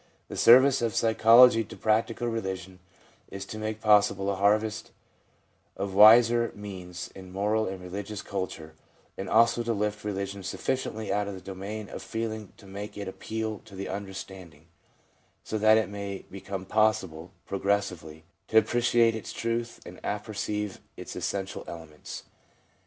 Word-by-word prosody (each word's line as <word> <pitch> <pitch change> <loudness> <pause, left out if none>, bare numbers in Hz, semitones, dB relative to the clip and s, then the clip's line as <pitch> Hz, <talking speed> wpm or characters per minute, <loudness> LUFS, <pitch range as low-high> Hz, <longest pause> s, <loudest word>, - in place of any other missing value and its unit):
The - - -6
service 130 +3 +6
of 115 -3 -1
psychology 115 +1 +6
to - - -11
practical 115 +2 0
religion 95 -5 -4 0.5
is 95 0 -7
to 110 - -7
make 110 0 -4
possible 100 -2 +3
a - - -2
harvest 105 +3 +1 0.9
of 100 0 -3
wiser 115 +3 +7
INTRODUCTION 110 - -9
17 - - -10
means 90 -3 -7
in 95 -1 -11
moral 105 +3 0
and 95 0 -5
religious 100 +3 -6
culture, 95 -5 -5 0.4
and 95 - -5
also 115 +1 +4
to 115 0 -1
lift 105 0 -2
religion 100 -1 -4
sufficiently 110 +2 -3
out 105 0 0
of 100 - -5
the - - -8
domain 100 +3 -7
of - - -8
feeling 110 -2 -4
to - - -16
make 100 +2 -8
it 100 - -5
appeal 110 +2 -4
to 100 - -13
the 95 +1 -5
understanding, 95 -4 -8 0.8
so 110 - -3
that 110 +1 +6
it 110 - +1
may 100 -1 -6
become 95 0 -6
possible, 95 -5 0
progressively, 95 -6 -2 0.2
to 110 - +2
appreciate 120 0 +4
its 110 - -6
truth 115 0 -3
and - - -10
apperceive 105 -2 -3 0.2
its - - -8
essential 95 -1 -3
elements. 80 -3 -9
105 Hz, 150 wpm, -28 LUFS, 95-110 Hz, 0.9 s, wiser